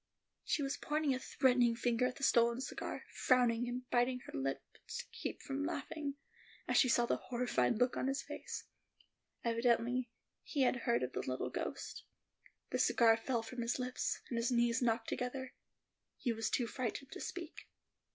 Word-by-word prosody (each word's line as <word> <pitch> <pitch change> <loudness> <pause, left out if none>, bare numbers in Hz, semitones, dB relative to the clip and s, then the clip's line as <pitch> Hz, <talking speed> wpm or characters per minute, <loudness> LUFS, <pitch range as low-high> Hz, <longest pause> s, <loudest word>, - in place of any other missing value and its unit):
She 295 - 0
was 275 - -1
pointing 300 -2 +1
a 255 - -2
threatening 250 -3 +3
finger 240 +1 +2
at 250 - -4
the 275 - -8
stolen 235 -1 +4
cigar, 265 - -4
frowning 245 -2 +3
and 250 +1 -4
biting 250 +1 +2
her - - -11
lips 135 0 -4
to - - -4
keep - - -5
from 275 +1 -2
laughing, 305 -2 -3 0.5
as - - +2
she 255 - +6
saw 240 0 +4
the - - +1
horrified 240 - +1
look 250 +2 +2
on - - 0
his 270 +1 -1
face. - - -6 0.8
Evidently, 235 +1 +2 0.3
he 280 -3 0
had 250 - +3
heard 235 - +3
of 125 - -2
the - - -2
little 130 0 -2
ghost; - - -4 0.7
the - - 0
cigar 225 -1 +5
fell 230 0 -1
from 240 +2 -5
his 235 0 0
lips, 250 0 -2
and 235 - -3
his 230 +2 +1
knees 235 -1 +3
knocked 230 -1 +1
together: 255 +1 -3 0.6
he 240 - 0
was 225 0 -1
too 245 - +1
frightened 255 +3 -3
to - - -7
speak. 340 -3 -6
245 Hz, 175 wpm, -36 LUFS, 235-260 Hz, 0.8 s, she